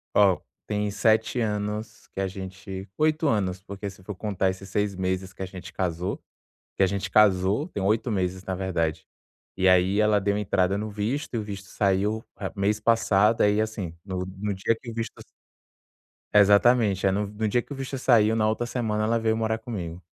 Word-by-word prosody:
Ó, 100 -3 +5 0.3
tem 105 -1 -1
7 110 +3 +2
anos 105 0 -3
que - - -5
a 95 - 0
gente 95 0 -7
8 155 0 +2
anos, 95 -5 0
porque 100 0 -6
se 95 -1 -15
for 105 - -5
contar 95 -1 0
esses 95 +1 -10
6 105 0 0
meses 95 0 -2
que - - -11
a - - -1
gente 95 -1 -10
casou. 90 +1 -2 0.6
Que - - +2
a - - +6
gente 100 +1 -3
casou 100 - +4
tem 100 - -4
8 110 +4 +1
meses 95 -1 -1
na 95 - -2
verdade. 85 -4 -2 0.5
E 95 0 +3
aí 90 +3 +4
ela 105 -1 +4
deu 100 +1 0
entrada 95 -1 +1
no 105 +1 -3
visto, 110 +8 -3
e - - 0
o 110 - -2
visto 100 -2 -7
saiu 100 +3 0
a - - -3
mês 105 +2 +1
passado, 110 -1 +3
aí 105 +1 +4
assim, 105 -6 -2
no 90 -1 -3
no 105 0 -2
dia 95 +4 +1
que 120 - -8
o - - -6
visto 115 0 -3
s - - -11 1.1
Exatamente. 105 0 +5
É, 95 - +4
no 100 +1 0
no 105 +1 -2
dia 120 +4 +2
que - - -21
o - - -3
visto 135 0 -5
saiu, 115 -4 +4
na 110 -1 +2
outra 120 +2 -1
semana 110 -3 -1
ela 115 +1 +2
veio 110 0 +1
morar 110 0 0
comigo. 90 -8 -6
105 Hz, 200 wpm, -26 LUFS, 95-110 Hz, 1.1 s, a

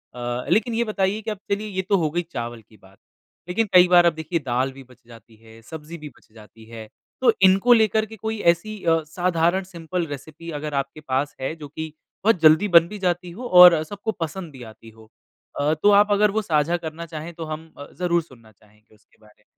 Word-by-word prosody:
अ, 120 0 -4
लेकिन 225 +2 +2
ये 235 - +1
बताइए 210 -1 -1
कि 220 0 -4
अब 210 - -5
चलिए 210 +2 -1
ये 190 -1 -2
तो 200 - +4
हो 160 -3 0
गई 175 +2 -1
चावल 120 -2 -5
की 110 +1 -23
बात। 95 0 -21 0.5
लेकिन 215 +4 0
कई 180 0 +7
बार 175 -1 +5
आप 170 - +3
देखिए 160 +2 -3
दाल 130 +2 -1
भी 135 - -12
बच 125 -1 -20
जाती 115 -1 -16
है, 115 +1 -18
सब्ज़ी 160 +6 -10
भी 150 -1 -9
बच - - -25
जाती 110 0 -16
है। 110 -1 -9 0.3
तो 245 -3 +5
इनको 195 +6 +5
लेकर 220 -1 +2
के 220 - -11
कोई 220 +1 -4
ऐसी 210 +3 -10
अ, 165 -1 +2
साधारण 175 +3 0
सिंपल 175 -1 -5
रेसिपी 155 +3 -9
अगर 150 0 -6
आपके 140 +2 -3
पास 135 +1 -2
है 135 +4 -3
जो 150 -3 -10
कि 160 +1 -7 0.3
बहुत 220 -3 +3
जल्दी 160 +6 +5
बन 170 -1 +6
भी 210 +3 -9
जाती 180 -1 -2
हो 245 +7 -7
और 175 -3 +8
सबको 205 +6 -5
पसंद 170 -2 -6
भी 130 -3 -12
आती 110 0 -14
हो? 110 0 -19 0.5
अ, 150 +2 +2
तो 205 +7 +2
आप 205 +1 +4
अगर 205 0 +3
वो 220 +1 -1
साझा 165 -2 0
करना 165 0 -7
चाहे 160 +1 -8
तो 165 0 -8
हम 155 +1 -8 0.3
ज़रूर 175 -1 +1
सुनना 115 -7 -19
चाहेंगे 105 +1 -27
उसके 110 - -31
बारे 105 -1 -21
में। - - -31
165 Hz, 225 wpm, -22 LUFS, 130-190 Hz, 0.5 s, और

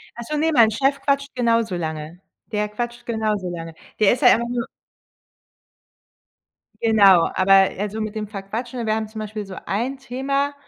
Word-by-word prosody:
Ach 235 - -7
so, 305 - -1
ne, 320 +2 +2
mein 225 -4 +6
Chef 270 +5 +1
quatscht 280 0 0
genauso 230 -5 +1
lange. 160 0 -5 0.3
Der 210 -1 0
quatscht 240 +3 -5
genauso 215 -5 -1
lange. 165 -1 -7 0.3
Der 215 +1 +5
ist 255 - -4
ja 245 - +7
einfach 235 +1 +3
nur 240 0 -2 2.2
Genau. 200 -6 +5
Aber 195 +1 +4 0.2
also, 210 +2 -3
mit 215 0 -4
dem 215 -1 -3
Verquatschen 225 +4 -5
wir 215 0 +1
haben 220 -1 -2
zum 220 +1 -9
Beispiel 215 -1 -5
so 190 - -9
ein 235 +9 -2
Thema, 275 +2 -2
220 Hz, 170 wpm, -22 LUFS, 200-245 Hz, 2.2 s, ja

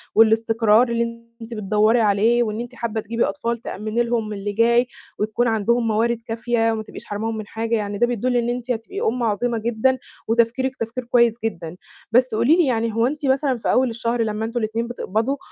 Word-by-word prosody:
والإستقرار 225 +1 +4
اللي 230 0 -2 0.2
أنتِ 230 +1 -8
بتدوّري 215 +2 +2
عليه 220 +3 +3
وإن 215 0 -3
أنتِ 245 +1 -8
حابّة 225 -2 -3
تجيبي 230 +2 -1
أطفال 235 -4 -2
تأمّني 220 +1 -2
لهم 230 -3 -2
اللي 205 0 -4
جاي 235 +3 +3 0.3
وتكون 215 +3 0
عندهم 230 +2 +1
موارد 230 +2 +1
كافية 230 0 0
وما 220 -1 -3
تبقيش - - -11
حرماهم 220 +2 -3
من 215 -1 -6
حاجة، 225 +1 -2
يعني 205 -1 -2
ده 240 - +3
بيدل 245 +1 -1
إن 240 0 0
أنتِ 245 +1 -3
هتبقي 245 - -4
أُم 240 +2 0
عظيمة 230 +2 0
جدًا 235 +3 +1 0.3
وتفكيرك 235 +3 +1
تفكير 230 +3 -4
كويس 235 -1 +4
جدًا. 170 -6 -4 0.4
بس 250 -1 +3
قولي 235 +8 +4
لي 350 -2 +3
يعني 230 -4 0
هو 230 +3 +2
مثلًا 265 -1 +1
في - - 0
أول 255 -1 +3
الشهر 230 +1 -2
لمّا 220 0 -1
أنتم 230 +2 -2
الإتنين 225 +2 -2
بتقبضوا 240 +2 -2
230 Hz, 190 wpm, -22 LUFS, 220-240 Hz, 0.4 s, والإستقرار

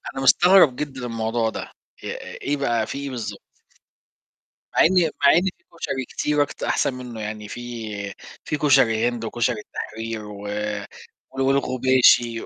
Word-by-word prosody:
أنا 135 - -3
مستغرب 175 0 +6
جدًا 135 -4 -5
الموضوع 115 0 -1
ده. - - -7 0.3
إ - - -5 0.3
إيه 145 +1 -1
بقى، 120 -5 0
في - - -5
إيه 140 0 -4
بالضبط؟ 120 -4 -6 1.3
مع - - +2
إن 175 -2 +4
مع 140 - +8
إن 170 - +5 0.2
في - - -37 0.2
كشري 130 -5 -3
كتير 150 0 0
أكت 145 - -8
أحسن 135 - +1
منه 125 -3 -7
يعني، 105 0 -5
في 110 -4 -6 0.3
في 150 - -1
كشري 120 -6 +4
هند، 120 -2 -5
وكشري 120 0 -1
التحرير، 110 0 -6
و 105 -1 -9 0.9
وال 135 - -4
والغباشي، 130 -3 +3
120 Hz, 150 wpm, -23 LUFS, 115-140 Hz, 1.3 s, مع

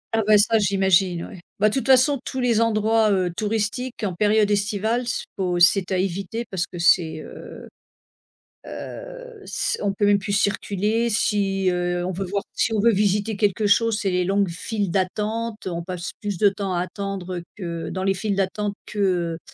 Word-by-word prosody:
Ah 225 - +2
bah, 210 -1 +7
ça 220 +2 +4
j'imagine 190 -3 +2
oui. 185 - -10 0.2
Bah 210 +1 +4
toute 265 +2 -2
façon 265 +1 +5
tous 260 - -5
les 235 -3 +2
endroits, 220 0 +2
heu, 185 -3 +1
touristiques 220 +3 -2
en 190 -3 -1
période 210 +2 +2
estivale, 215 +4 0 0.3
faut 180 -3 -1
c'est 185 +2 +4
à 185 - +1
éviter 195 +5 -2
parce 180 -2 -2
que 175 - -10
c'est, 165 -2 +3
heu - - -11 1.0
heu, - - -9
s 400 -1 0
on 200 -1 +1
peut 205 +1 0
même 205 0 +4
plus 200 +1 -4
circuler. 205 +3 0
Si, 195 -3 +1
heu, 175 0 -1
on 185 - -2
veut 195 +2 -3
voir 200 +2 -2
si 225 - 0
on 215 - +1
veut 235 +2 +5
visiter 205 +1 +1
quelque 205 +1 +1
chose, 225 +1 +3
c'est 195 - 0
les 180 0 +1
longues 195 0 +1
files 200 +3 -3
d'attente, 215 +4 -2
heu - - -1
on 170 0 -3
passe 180 0 -5
plus 205 -4 -3
de 205 - +5
temps 195 -1 -3
à 175 - 0
attendre 185 -2 -5
que, 170 -4 -5
dans 185 - -4
les 195 0 +1
files 200 +2 -2
d'attente 200 +1 -1
que, 210 - -8 0.4
heu, - - -8
200 Hz, 190 wpm, -23 LUFS, 185-220 Hz, 1.0 s, bah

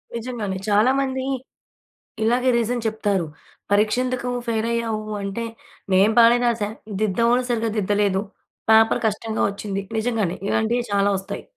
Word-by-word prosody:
నిజంగానే. 225 -5 -4
చాలా 210 +5 +4
మంది 260 -1 -2 1.0
ఇలాగే 250 +3 +2
రీజన్ 235 0 -1
చెప్తారు. 205 -5 0 0.5
పరీక్ష 210 +3 +3
ఎందుకు 250 -1 -2 0.2
ఫెయిల్ 225 0 0
అయ్యావు? 225 -2 -1 0.2
అంటే, 200 +4 -3 0.5
నేను 195 +4 +5
బానే 235 +1 +7
రాసా. 225 -3 0 0.3
దిద్దేవాళ్ళు 235 +5 +2
సరిగ్గా 230 -2 0
దిద్దలేదు. 200 -1 +1 0.5
పేపర్ 225 +2 +5
కష్టంగా 220 +1 -1
వచ్చింది. 200 -1 -4 0.2
నిజంగానే 220 -6 -1
ఇలాంటివి 235 +2 +1
చాలా 200 0 +3
వస్తాయి. 195 +1 -6
220 Hz, 125 wpm, -22 LUFS, 205-235 Hz, 1.0 s, బానే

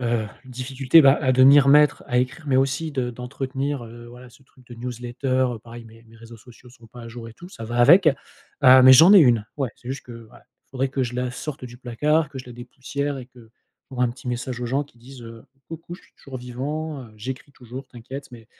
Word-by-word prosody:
heu, 115 -2 -1 0.2
difficulté, 130 +4 +2
bah, 135 +1 +5
à 130 -3 +1
devenir 135 +2 +6
maître 150 0 +4
à 125 - 0
écrire, 130 +5 -3
mais 130 -2 +1
aussi 135 +4 0
de 130 -3 -3
d'entretenir, 135 +2 -5
heu, 120 +1 -12
voilà, 125 +1 -14
ce 130 +2 -21
truc 130 -1 -25
de 120 - -11
newsletter, 120 +2 -6 0.3
heu, - - -9
pareil, 115 +1 -12
mes 115 0 -17
mes 115 0 -19
réseaux 115 +1 -13
sociaux 125 +2 -18
sont 120 -2 -18
pas 120 +2 -13
à 115 - -9
jour 115 0 -9
et 115 - -14
tout 175 - -13
ça 115 - -10
va 120 +2 -5
avec, 155 +9 +6
heu, 130 -2 +2
mais 130 +1 +9
j'en 165 +9 +8
ai 200 - +9
1, 120 -7 +3
ouais. 135 -4 -2
C'est 120 - -13
juste 135 +1 -6
que, 120 - -10 0.2
voilà, - - -19 0.3
faudrait 135 0 -2
que 130 0 -2
je 125 0 -4
la 125 0 -2
sorte 140 +2 -7
du 120 -1 -10
placard, 150 +6 0
que 140 - -10
je 125 - -10
la 125 - -10
dépoussière 135 +3 -5
et 125 - -9
que, 120 -3 -19 0.4
pour 125 -2 -3
un 125 - +2
petit 125 +1 -9
message 125 0 -4
aux 120 - -3
gens 140 +4 -1
qui 120 -4 -25
disent, 125 +1 -13
heu: 115 0 -11 0.3
«Coucou, 165 +1 -9
je - - -22
suis - - -26
toujours 135 -2 -10
vivant, 140 +4 -5
heu, 110 -3 -15
j'écris 130 +6 -7
toujours, 130 +2 -10
t'inquiète» 130 +3 -10
mais 115 -2 -14
125 Hz, 240 wpm, -22 LUFS, 120-135 Hz, 0.4 s, mais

